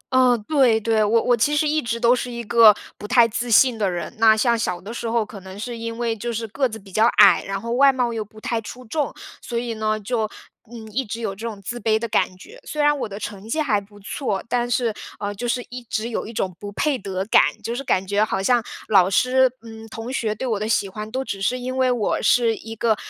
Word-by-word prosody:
嗯， 250 -2 +5
对 260 -7 +4
对， 220 0 +1
我 225 +2 +3
我 245 - +3
其 290 +6 +1
实 305 0 +2
一 305 +1 +1
直 235 0 -3
都 240 +1 +4
是 250 0 -4
一 235 0 -5
个 230 0 +7 0.3
不 210 - -7
太 240 0 +5
自 240 +2 -3
信 230 0 +5
的 200 - +1
人。 175 -3 -4
那 220 -1 +6
像 235 0 +2
小 180 -6 -2
的 205 +5 -8
时 235 -1 -4
候， 230 -1 +1
可 205 -1 -10
能 190 +1 -11
是 240 +2 -5
因 230 0 -5
为 235 -1 -1
就 235 +2 -4
是 225 0 -3
个 260 +4 0
子 220 - -7
比 195 -2 -15
较 220 +4 +4
矮， 200 -4 +7
然 195 0 -3
后 230 +2 -5
外 275 +2 +6
貌 245 -2 -1
又 220 -1 -2
不 215 +1 -16
太 225 +1 -2
出 250 +3 -10
众。 295 +5 -2 0.3
所 235 - -4
以 235 -1 -2
呢， 215 0 -1
就， 220 0 -2 0.4
嗯， 225 -2 -9
一 265 +5 -1
直 225 +1 -6
有 220 -4 -3
这 225 +4 -6
种 210 -3 -7
自 240 +5 -4
卑 220 -1 +2
的 235 - -3
感 185 -4 0
觉， 460 - -14
虽 300 - -7
然 295 0 +4
我 215 - -3
的 200 - -7
成 210 0 -7
绩 315 - -1
还 220 -9 +1
不 205 +1 -17
错， 200 -1 -3
但 240 0 0
是， 240 -2 +1 0.3
呃， 205 0 -3
就 240 +4 -4
是 245 0 -1
一 250 0 -7
直 225 0 -3
有 225 - -3
一 225 - -7
种 185 -4 -2
不 205 - -7
配 300 +4 +1
得 190 -1 -4
感。 220 - +6 0.2
就 230 - -3
是 275 - -4
感 190 -7 +1
觉 205 +2 +1
好 195 -3 -1
像 245 +1 +3 0.3
老 190 -3 +5
师、 255 +5 +3
嗯， 225 -1 -11
同 225 +3 -7
学 215 -4 -1
对 260 - -5
我 215 -4 -1
的 215 - -2
喜 205 -3 +1
欢， 210 +2 -7
都 260 +3 -3
只 195 -6 -5
是 250 +6 +1
因 255 +1 -4
为 260 -1 +3
我 230 -4 0
是 230 -2 +3
一 225 0 -9
个， 225 0 +2
225 Hz, 285 characters per minute, -22 LUFS, 210-245 Hz, 0.4 s, 个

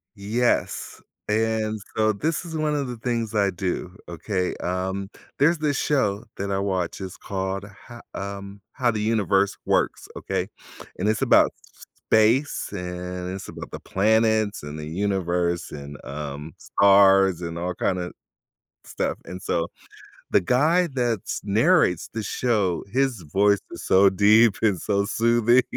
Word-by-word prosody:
Yes, 115 +4 -1 0.3
and 110 0 0 0.2
so 110 0 +3
this 155 - -2
is 165 -2 -5
one 155 -1 0
of 140 -2 -1
the 125 -1 -6
things 115 -2 -2
I 100 -2 +3
do, 90 0 -3
okay? 90 +2 -2
Um, 95 +2 -3 0.3
there's 160 +4 +3
this 150 -2 0
show 105 -8 +1
that 100 0 -3
I 95 - 0
watch, 95 -3 -2
it's 95 -1 -7
called 95 0 -4 0.2
Ha 120 -1 -11
um, 100 0 -6
How 125 -3 +1
the 105 - -3
Universe 100 -3 +2
Works, - - 0
okay? - - -2 0.5
And, 95 - -1
it's 110 -1 +1
about - - +5
sp - - -21
space, 115 +7 +3
and 90 -1 -5
it's 95 - -8
about - - -8
the - - -6
planets 110 0 +1
and 75 +1 -7
the 75 - -6
universe 85 -1 -1
and, 70 0 -8
um, 75 +1 -6
stars 95 -2 +5
and 85 -1 -4
all 90 +1 -3
kinda 90 -1 -1 0.7
stuff, - - -2
and 90 +1 -8
so, 85 -3 -1 0.7
the - - +5
guy 155 - +3
that's 120 -5 -1
narrates 110 - +3
the 110 - -3
show, 100 -6 0
his 130 -5 0
voice 100 +1 +4
is - - -7
so 95 +1 +5
deep 105 +3 +5
and 105 -5 +2
so 100 -1 0
soothing 120 +3 +3
100 Hz, 150 wpm, -24 LUFS, 90-115 Hz, 0.7 s, about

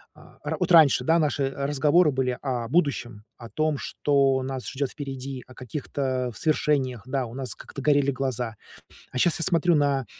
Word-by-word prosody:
а, - - -18
ра - - -3
вот - - 0
раньше, 150 -6 +6
да, 165 +1 +4
наши, 150 -2 0
э, 135 +1 -2
разговоры 150 +3 +3
были 130 -2 -1
о 125 -4 -2
будущем, 125 -9 0
о 115 - -10
том, 155 -1 0
что 135 -2 +1
нас 130 -1 -5
ждёт 140 0 -2
впереди, 135 -3 -6
о 130 - -15
каких-то 130 0 -3
свершениях, 140 -7 0
да, 130 -1 -2
у 115 - -10
нас 130 -1 -5
как-то 140 - -10
горели 145 -1 +3
глаза. 125 -4 -2 0.6
А - - -5
сейчас 165 +6 +2
я - - 0
смотрю 170 -1 +3
на, 140 -3 +1
135 Hz, 180 wpm, -25 LUFS, 130-150 Hz, 0.6 s, раньше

